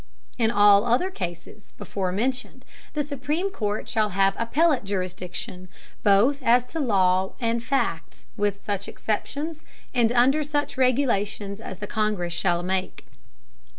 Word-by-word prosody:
In 225 -2 +3
all 205 -2 +6
the 235 - -4
other 260 +11 +2
Cases 175 - -7
before 190 -2 -3
mentioned, 250 +6 -3 0.3
the 295 - +1
supreme 295 +7 -2
Court 210 - -3
shall 215 -2 +1
have 195 0 +2
appellate 280 +4 +2
Jurisdiction, 185 -1 -5 0.3
both 225 +8 +4
as 245 0 +4
to 325 - -2
Law 190 -7 +2
and 230 -1 0
Fact, 170 - -2
with 205 -1 -1
such 200 -1 -3
Exceptions, 295 +9 -3 0.3
and 235 -3 +3
under 255 +5 +4
such 290 0 -2
regulations 225 -6 0
as 190 - -7
the 205 - -5
Congress 205 -5 -1
shall 175 -1 0
make. 185 +1 -2
215 Hz, 140 wpm, -25 LUFS, 195-260 Hz, 0.3 s, all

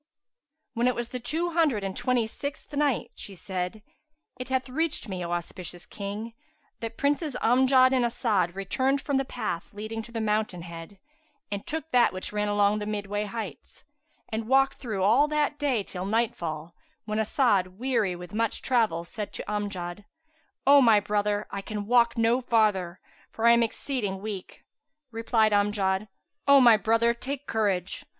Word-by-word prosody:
When 240 +1 +1
it 250 - +2
was 240 -1 -4
the 250 - -5
Two 320 +8 -2
Hundred 310 -11 +2
and 195 -1 -3
Twenty 245 -2 +1
sixth 280 +5 -7
Night, 285 -3 0
She 200 - -9
said, 185 +3 -4 0.6
It 255 - -6
hath 260 0 0
reached 305 0 -1
me, 185 -3 -4
O 170 - -4
auspicious 175 0 -5
King, 210 +3 -6 0.5
that 230 0 -6
Princes 290 0 0
Amjad 260 +2 +5
and 255 -2 +3
As'ad 210 -7 0
returned 260 +8 0
from 280 -1 -1
the 270 - 0
path 175 -9 -4
leading 215 +2 -5
to 230 - -13
the 230 - -3
Mountain 210 -5 -1
head 170 +3 -9 0.5
and 200 -1 -4
took 320 0 -4
that 245 -4 +4
which 185 +2 -6
ran 210 0 0
along 205 0 +2
the 210 - -4
midway 205 0 -2
heights, 205 - -7 0.4
and 220 0 -3
walked 270 +2 +3
through 215 -7 -3
all 240 +9 +5
that 300 -1 0
day 265 -8 +1
till 185 0 -6
nightfall, 175 -8 -2 0.3
when 215 0 -2
As'ad, 205 -5 +1
weary 230 -6 0
with 180 +2 -10
much 225 0 -1
travel, 225 -10 +1
said 205 +4 -6
to - - -6
Amjad, 200 -2 -4 0.6
"O 280 +1 +8
my 225 -4 +6
brother, 205 0 0
I 200 - -4
can 210 0 -5
walk 235 +1 +3
no 230 +3 +3
farther, 205 -7 +1 0.3
for 225 - -3
I 235 - +8
am 235 0 +5
exceeding 225 -4 -2
weak." 200 -2 -7 0.5
Replied 225 -1 +2
Amjad, 205 -1 +1 0.4
"O 280 0 +8
my 240 -3 +8
brother, 230 +2 +2
take 275 +4 -6
courage! 200 -7 -1
220 Hz, 170 wpm, -27 LUFS, 200-250 Hz, 0.6 s, O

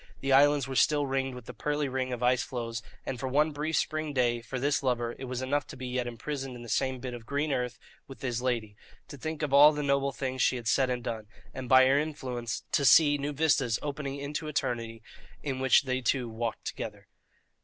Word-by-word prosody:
The 135 0 +1
islands 145 -1 +5
were 135 - -5
still 145 +2 +3
ringed 135 -1 -1
with 125 -2 -10
the 125 - -8
pearly 145 +5 -1
ring 130 -1 -2
of 125 0 -3
ice 125 +1 +3
floes, 115 -3 -4 0.2
and 125 - -4
for 130 - -3
one 150 +4 +2
brief 150 +1 -2
spring 155 -1 -1
day, 120 -3 +1
for 130 +3 -5
this 140 +3 +1
lover, 120 -3 -1
it 135 - -5
was 130 0 -4
enough 145 +2 0
to - - -10
be 130 - -6
yet 125 0 -2
imprisoned 130 +2 -5
in 120 - -9
the 120 - -10
same 130 +4 0
bit 125 0 -5
of 115 -1 -9
green 145 +1 0
earth 125 -2 -2 0.3
with 135 - -12
his 125 -2 -1
lady, 115 -5 -2 0.3
to 145 - -8
think 155 +3 -5
of 145 -2 -1
all 145 +2 +9
the 150 -1 -3
noble 140 0 +1
things 130 -1 -3
she - - +3
had 120 -2 -5
said 130 +1 +3
and 125 -1 -2
done, 110 -2 -4 0.3
and, 130 -2 -6
by 130 0 +8
her 135 +2 +4
influence, 130 -7 -4
to 140 - +2
see 145 +3 +6
new 145 +1 -2
vistas 140 -6 +2
opening 140 -1 -4
into 145 +2 -4
eternity 115 -6 -3 0.4
in 135 -3 -3
which 130 +1 +5
they 130 -1 -1
two 125 0 0
walked 115 0 -4
together. - - -6
130 Hz, 230 wpm, -29 LUFS, 125-145 Hz, 0.4 s, all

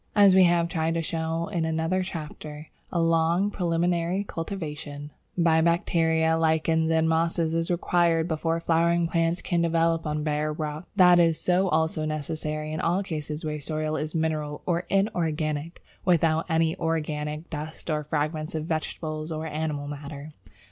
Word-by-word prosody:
As 200 -2 +7
we 185 -1 +7
have 170 -1 +3
tried 165 -1 -1
to 165 - 0
show 165 +1 -2
in 175 -5 -1
another 160 +3 0
chapter, 155 -3 -7 0.2
a 175 - 0
long 165 +4 +2
preliminary 175 +1 0
cultivation 150 -6 -6 0.3
by 165 -2 +4
bacteria, 160 -1 +2
lichens, 160 0 +2
and 160 0 +3
mosses 165 0 +1
is 165 0 0
required 170 -2 +2
before 165 0 -1
flowering 170 +1 +2
plants 165 +1 0
can 175 -2 +1
develop 165 -1 +1
on 150 0 -1
bare 150 0 0
rock. 150 +1 -5
That 180 -3 +7
is 165 -2 +2
also 160 -4 +2
necessary 155 0 -3
in 155 - -2
all 180 +4 +1
cases 155 -3 -5
where 150 0 -2
the - - -8
soil 155 +1 -2
is 155 +1 -3
mineral 155 -2 -2
or 175 0 -1
inorganic, 165 -5 -1 0.2
without 165 -2 +2
any 160 0 +2
organic 155 -1 -2
dust 155 +1 -6
or 150 0 -1
fragments 155 +1 -2
of 155 -1 -2
vegetable 155 -1 -3
or 155 0 -3
animal 150 -2 -3
matter. 145 +1 -7
160 Hz, 155 wpm, -26 LUFS, 155-170 Hz, 0.3 s, As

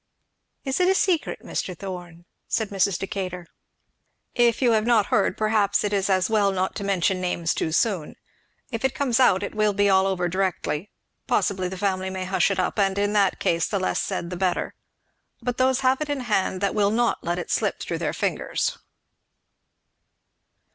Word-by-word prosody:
"Is 270 +3 -1
it 365 - +3
a 385 - +3
secret, 360 -4 0
Mr. 180 -2 -4
Thorn?" 175 -3 -8 0.2
said 220 -3 -1
Mrs. 195 -2 +1
Decatur. 185 -2 -4 0.9
"If 240 -2 +3
you 245 -3 +3
have 220 0 +2
not 225 -4 +4
heard, 195 -2 +2
perhaps 215 -2 +2
it 205 0 -1
is 200 0 +1
as 185 -1 +2
well 210 -3 +2
not 190 0 -1
to - - -4
mention 190 -1 +1
names 170 -2 -1
too 160 - -2
soon; 175 -3 0 0.6
if 230 0 -4
it 265 - +1
comes 260 -3 +1
out 205 -7 +4
it - - -4
will 215 -1 +2
be 205 0 +3
all 190 0 +4
over 180 -2 0
directly; 185 -1 -2 0.4
possibly 185 -3 +1
the 190 - -6
family 190 -1 -1
may 190 0 -4
hush 190 +2 +2
it 195 - -1
up, 185 +3 -1
and 195 -1 +2
in 205 +1 +1
that 200 -2 +2
case 165 0 +1
the 205 - -1
less 185 - 0
said 185 -3 -3
the - - -3
better; 185 -1 -1 0.7
but 245 0 -3
those 260 0 +3
have 260 +2 +2
it 300 - -2
in 285 -2 -1
hand 195 -5 0
that 200 - +1
will 205 -2 +2
not 235 +2 0
let 175 +1 -1
it 175 - -5
slip - - 0
through - - -4
their - - -1
fingers." - - -2
195 Hz, 190 wpm, -24 LUFS, 185-220 Hz, 0.9 s, not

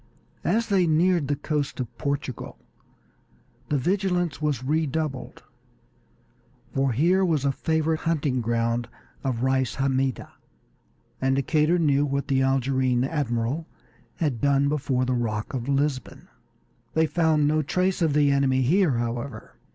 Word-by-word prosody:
As 230 +1 +1
they 190 -4 +3
neared 165 -1 +2
the 145 - 0
coast 145 -1 -3
of 125 -3 -5
Portugal 140 -4 -4 1.1
the 145 - +2
vigilance 175 -1 0
was 145 -5 -1
redoubled, 150 -1 -2 1.3
for 135 -1 +1
here 175 +10 +3
was 155 -6 +1
a 140 - +3
favorite 160 +2 0
hunting 150 -6 0
ground 115 +1 0 0.4
of 130 -3 -2
Reis 130 -1 +1
Hammida, 135 -1 -1 0.9
and 135 0 +2
Decatur 155 +4 +2
knew 145 -4 +2
what 140 0 -2
the 135 -1 +2
Algerine 130 -1 +1
admiral 135 +1 -2 0.5
had 145 -8 -2
done 140 0 +3
before 130 -3 0
the 130 - 0
Rock 110 -1 -2
of 125 0 -3
Lisbon. 140 -3 -1 0.7
They 160 0 +4
found 160 -2 +2
no 155 +1 +2
trace 180 +5 0
of 160 -3 +2
the 145 -1 +4
enemy 135 -2 +2
here, 170 +3 +3
however. 120 +3 -4
140 Hz, 135 wpm, -25 LUFS, 130-160 Hz, 1.3 s, They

